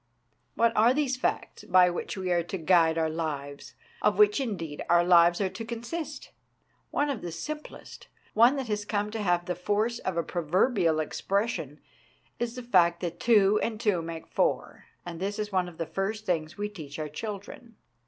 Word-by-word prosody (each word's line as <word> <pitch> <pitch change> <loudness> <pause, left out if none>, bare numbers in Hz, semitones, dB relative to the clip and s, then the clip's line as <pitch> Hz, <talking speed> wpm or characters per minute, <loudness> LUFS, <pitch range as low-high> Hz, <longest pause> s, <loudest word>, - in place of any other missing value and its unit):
What 230 0 +3
are 235 +4 +5
these 280 -3 +1
facts 255 - -3
by 180 0 +5
which 175 - -5
we 185 -1 -2
are 175 -1 +3
to 175 +3 -5
guide 165 -1 +3
our 160 -1 +2
lives, 145 -3 -5 0.3
of - - +2
which, 415 -5 +5
indeed, 170 - -4
our 175 0 +5
lives 175 -1 +5
are 195 -2 +1
to 225 - -7
consist? 245 +7 -6 0.6
One 290 0 0
of 255 - -4
the 175 - -5
simplest, 300 - -8 0.3
one 235 +5 +5
that 270 -3 -3
has 210 -1 -2
come 205 0 -2
to 225 0 -4
have 175 -3 +1
the 180 - -1
force 210 +6 -1
of 185 -2 -3
a 170 - +1
proverbial 175 - +1
expression, 175 - -2 0.6
is 240 0 -2
the 250 - -6
fact 175 -7 +3
that 175 -1 -4
two 210 -3 +4
and 220 -2 -2
two 205 -7 +1
make 165 0 -7
four, - - -1 0.2
and 170 -1 -7
this 200 +2 -3
is 210 -1 -3
one 185 -2 0
of 165 - -16
the 165 - -2
first 195 +6 -3
things 155 -5 -2
we 205 0 -2
teach 155 -9 -9
our 155 -1 -3
children. 210 - -8
190 Hz, 190 wpm, -28 LUFS, 170-225 Hz, 0.6 s, are